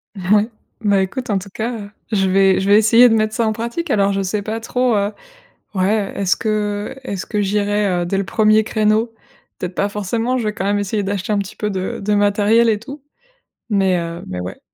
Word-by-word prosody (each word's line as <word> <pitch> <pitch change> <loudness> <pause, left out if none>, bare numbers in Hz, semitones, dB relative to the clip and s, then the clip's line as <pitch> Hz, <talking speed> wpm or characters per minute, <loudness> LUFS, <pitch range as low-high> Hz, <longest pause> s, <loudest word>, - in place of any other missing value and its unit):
Ouais, 205 +3 +2 0.3
bah, 205 -3 +3
écoute, 240 +7 -4
en 205 - +2
tout 190 +1 -6
cas, 225 +2 -2
heu, 205 -1 -9 0.2
je 195 -3 +2
vais 195 0 +4
je 190 - -2
vais 205 +1 +6
essayer 230 +3 +6
de - - +3
mettre 215 0 +1
ça 230 - +1
en 220 - +1
pratique. 235 +9 -4
Alors 200 -1 +3
je 195 - -1
ne - - -1
sais 205 +2 -2
pas 220 +2 -4
trop, 245 +1 0
heu 205 +1 0 0.6
ouais, 195 +2 +1
est-ce 195 +1 +1
que 210 +1 -2
est-ce 200 -7 -4
que 210 -2 -1
j'irai 205 -2 0
dès 195 - -1
le 195 - 0
1er 215 +1 +3
créneau? 215 +1 +1 0.5
Peut-être, 180 0 -5
pas 200 - +1
forcément, 225 +5 -1
je 235 - -2
vais 210 - -1
quand 195 - -4
même 205 +1 +1
essayer 205 +1 -1
d'acheter 195 +1 -3
un 210 - +2
petit 200 0 -5
peu 210 - -2
de 190 -2 -3
de 210 +1 +1
matériel 205 +3 +3
et 215 -2 +1
tout, 275 +5 -10 0.7
mais 195 -3 +2
heu 170 +1 -5
mais 90 0 -5
ouais. 90 +1 -7
205 Hz, 225 wpm, -19 LUFS, 195-220 Hz, 0.7 s, vais